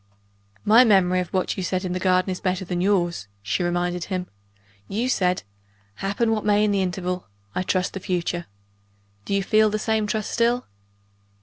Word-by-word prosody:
"My 225 +4 +7
memory 190 -5 +4
of 180 - -2
what 185 +1 -1
you - - -2
said 185 +1 -1
in 180 - -2
the 185 - -2
garden 185 0 +2
is 185 - -4
better 185 0 -1
than 175 0 -2
yours," 175 - +1 0.2
she 105 - -1
reminded 175 0 -1
him. 185 -2 -3 0.6
"You 225 +5 -1
said 180 -7 +1 0.5
'Happen 200 +4 0
what 215 -1 0
may 210 0 +3
in 210 - +2
the 200 -1 +2
interval, 180 0 -2 0.3
I - - -1
trust 185 0 0
the 195 - -4
future.' 175 -1 -2 0.8
Do 200 - -1
you 200 - +1
feel 215 +2 +4
the 215 - -1
same 215 0 0
trust 215 0 -2
still?" 235 +1 +1
185 Hz, 185 wpm, -24 LUFS, 180-210 Hz, 0.8 s, My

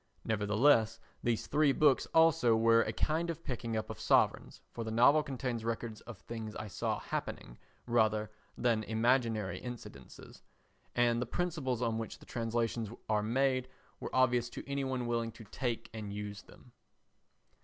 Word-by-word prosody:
Nevertheless 110 +2 +3 0.2
these 120 -2 0
three 150 0 +3
books 145 -2 +3
also 160 -8 +4
were 115 +1 +5
a - - -1
kind 165 +2 0
of 165 0 -5
picking 115 -3 -3
up 110 - -3
of - - -9
sovereigns, - - +2
for 115 - -5
the 110 - -4
novel 125 +7 +5
contains 130 -5 -3
records 115 -1 -3
of 120 -4 -10
things 110 +4 -7
I 110 - -6
saw - - -1
happening - - -5 0.3
rather 110 -3 +2 0.3
than 115 -2 +2
imaginary 110 -4 +1
incidents, 125 -1 -9 0.8
and 120 -1 +3
the 125 - -2
principles 140 -7 -1
on 115 -1 0
which 115 - -5
the - - -16
translations 115 -1 -2 0.2
are 105 -1 +2
made 130 +3 +1 0.3
were - - -5
obvious 125 -2 +3
to - - -8
any 140 0 -1
one 130 -2 -2
willing 115 -1 -1
to 115 - -12
take 115 +2 -3
and 105 -2 -6
use 105 0 -5
them. 125 - -18
115 Hz, 160 wpm, -33 LUFS, 110-130 Hz, 0.8 s, were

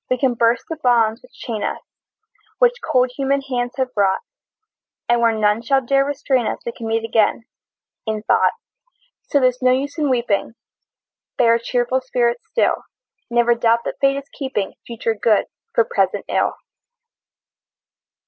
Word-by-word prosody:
We 255 - +2
can 255 -1 +1
burst 235 0 +2
the 325 - -5
bonds 230 -1 +2
which 250 - -19
chain 220 -3 -5
us, - - -2 0.8
Which - - +3
cold 250 0 +2
human 275 0 0
hands 245 -3 -3
have 260 -1 -1
wrought, 200 -2 +2 0.9
And 240 0 +2
where 230 -1 +4
none 215 0 +1
shall 270 +2 +1
dare 275 +2 +3
restrain 270 -4 0
us - - -2
We 235 - -2
can 230 -1 -7
meet 225 0 0
again, 225 0 +1 0.6
in 215 -1 -2
thought. - - +3 0.7
So 285 - +2
there's 255 -1 +1
no 255 0 +4
use 280 +4 -1
in 295 -2 +1
weeping, 235 -3 0 0.8
Bear 230 -1 +5
a 230 - +1
cheerful 245 +2 0
spirit 240 -2 0
still; 475 - +1 0.4
Never 240 0 +3
doubt 235 0 +2
that - - -5
Fate 275 0 +3
is 280 0 -7
keeping 260 -9 -3
Future 230 -1 -2
good 215 -1 +2 0.3
for 470 - +4
present - - 0
ill! - - 0
245 Hz, 160 wpm, -20 LUFS, 230-265 Hz, 0.9 s, Bear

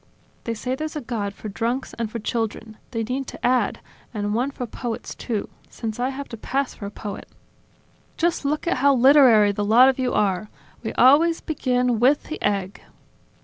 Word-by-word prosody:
They 230 - -2
say 250 +4 -3
there's 310 +4 -4
a 300 - -3
God 225 -5 -3
for - - -8
drunks 235 +5 -2
and 230 -2 -3
for 235 - -4
children. 225 -1 -3
They 230 -3 -2
need 255 +3 -3
to - - -6
add: 250 0 +1 0.3
And 205 0 -1
one 245 +5 0
for 265 -3 -5
poets, 235 0 -5
too, 220 -5 -3 0.2
since 225 -1 -5
I 250 +1 0
have 275 +1 -6
to 230 - -7
pass 270 +4 -2
for 200 - -7
a - - -5
poet." 205 0 -7 0.9
"Just 340 -1 0
look 295 +2 -1
at 340 - +1
how 275 +1 +4
literary 250 -5 +6
the 205 +1 -2
lot 235 +5 +6
of 265 - -1
you 255 -1 0
are. 200 0 0 0.3
We 220 - -4
always 310 +7 +5
begin 250 -5 0
with 270 +5 +4
the 315 - -7
egg!" 200 -1 -1
245 Hz, 190 wpm, -23 LUFS, 215-270 Hz, 0.9 s, literary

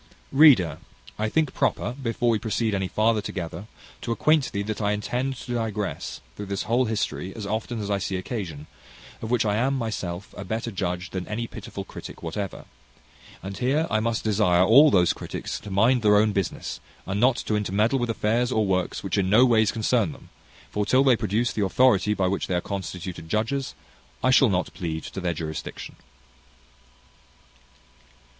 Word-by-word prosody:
Reader, 135 - +6 0.4
I 110 0 0
think 155 +2 +1
proper, - - 0
before 120 -2 0
we 110 - +1
proceed 110 0 -1
any 95 -1 0
farther 110 +2 +2
together, 90 -1 -6 0.3
to 120 - -3
acquaint 150 +4 +2
thee 100 - -2
that 110 +1 -4
I 105 0 +1
intend 125 +6 -2
to 120 0 -6
digress, 110 -4 -3
through 105 - -7
this 100 -1 -2
whole 125 +3 +2
history, 105 -4 -3
as 110 -3 -6
often 110 +3 -3
as 105 -1 -3
I 100 - +1
see 95 - -3
occasion, 90 - -5 0.6
of 110 - -5
which 120 -1 +2
I 105 0 +1
am 135 +4 +1
myself 100 -6 -4
a - - -6
better 110 +4 -3
judge 90 -2 -3
than 95 -1 -4
any 115 +3 -3
pitiful - - -8
critic - - -10
whatever; 95 +4 -5 0.8
and 95 +1 -6
here 140 +6 +2
I 110 - +3
must 115 0 -1
desire 100 -5 +3
all 135 +10 +7
those 90 -9 +4
critics - - -5
to 105 - -10
mind 115 +6 +3
their 105 -1 +5
own 105 +1 +4
business, 100 -3 -3 0.3
and 100 +2 -2
not 125 +2 +4
to 110 - -2
intermeddle 105 +5 +1
with 120 -1 -1
affairs 115 +2 +1
or 110 -3 +2
works 95 -2 -1
which 95 -2 -1
no 100 +6 +5
ways 110 -3 +4
concern 110 -6 +1
them; - - -16 0.4
for 105 - 0
till 130 +6 +4
they 130 -3 +5
produce 110 +2 0
the 105 - 0
authority 105 -1 +3
by 95 -2 +1
which 100 +1 -1
they 90 - -1
are - - +2
constituted 90 -4 -6
judges, 115 +8 -1 0.5
I 130 - +4
shall 130 -1 +6
not 90 -2 -1
plead 80 -4 -4
to 95 - -6
their 85 -2 -1
jurisdiction. 80 -1 -6
105 Hz, 180 wpm, -25 LUFS, 95-120 Hz, 0.8 s, all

